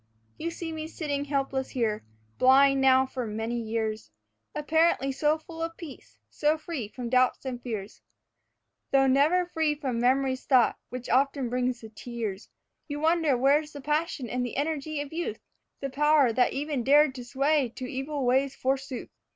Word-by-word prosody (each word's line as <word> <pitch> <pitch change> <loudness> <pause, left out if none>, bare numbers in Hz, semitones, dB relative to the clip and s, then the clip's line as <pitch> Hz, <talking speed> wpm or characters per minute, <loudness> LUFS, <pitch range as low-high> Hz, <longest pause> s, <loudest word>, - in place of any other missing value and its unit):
You 335 - -2
see 335 -1 -6
me 315 -1 -5
sitting 290 -3 -3
helpless 275 -2 -1
here, 220 -4 -1 0.4
blind 275 +1 +5
now 265 0 +5
for 255 -2 -5
many 225 +3 -3
years, 220 - -3 0.5
Apparently 305 -2 +2
so 300 +3 +1
full 325 +1 -10
of 330 0 -4
peace, 315 -6 -11
so 305 +1 +1
free 310 -8 -5
from 245 +3 -7
doubts 255 +2 +2
and 250 -2 -4
fears, 215 -4 -6 0.9
Though 270 0 +4
never 295 +7 +3
free 320 -3 0
from 265 -5 -3
Memory's 260 +1 +1
thought 255 -4 +4
which 250 0 -6
often 270 0 +1
brings 250 0 -1
the 220 - -10
tears, 220 -3 -5
And - - -45 0.3
you 290 -1 -4
wonder 320 -3 +2
where's 290 +4 +2
the 285 - -8
passion 300 -2 -1
and 250 +2 -2
the 245 - -4
energy 305 0 -2
of 290 +1 -7
youth, 345 +6 -3 0.4
The 275 -1 -3
power 295 -3 +4
that 250 +2 +3
even 285 -2 -2
dared 290 +2 +5
to 255 -2 -7
sway 275 +2 +1
to 255 - -5
evil 270 +2 -3
ways 265 +2 +2
forsooth. 265 -1 -3
270 Hz, 170 wpm, -27 LUFS, 250-300 Hz, 0.9 s, blind